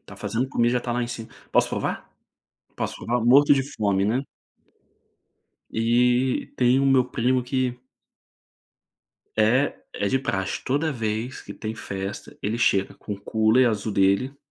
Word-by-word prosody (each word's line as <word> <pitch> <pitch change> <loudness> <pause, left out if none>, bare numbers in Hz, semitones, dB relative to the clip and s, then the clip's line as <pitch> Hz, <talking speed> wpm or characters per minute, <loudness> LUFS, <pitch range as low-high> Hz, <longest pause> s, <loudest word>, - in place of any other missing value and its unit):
Está - - -14
fazendo 120 +3 -2
comida, 120 -2 +1
já 125 - +2
está 120 0 -3
lá 120 +1 0
em 120 - -3
cima, 115 -2 -6 0.2
"Posso - - +3
provar? - - -3 0.7
Posso - - -3
provar?". 120 0 -1
Morto 140 +4 +6
de 135 - +1
fome, 100 -2 0
né. 115 +6 +1 1.5
E 120 +3 +1
tem 125 +1 +4
o 140 - +2
meu 135 -2 +4
primo 125 +1 0
que 125 -1 -1 1.6
eh, 120 +6 +3 0.2
é 100 - -1
de 135 - +2
praxe, 95 -7 -2
toda 145 +4 0
vez 115 +1 -3
que - - -10
tem 110 0 -5
festa, 100 -2 -6
ele 110 +3 -1
chega 95 -4 +2
com 105 - -7
o 100 - -14
cooler 110 +4 +3
azul 110 -1 -2
dele 100 +9 +2
120 Hz, 155 wpm, -24 LUFS, 110-130 Hz, 1.6 s, Morto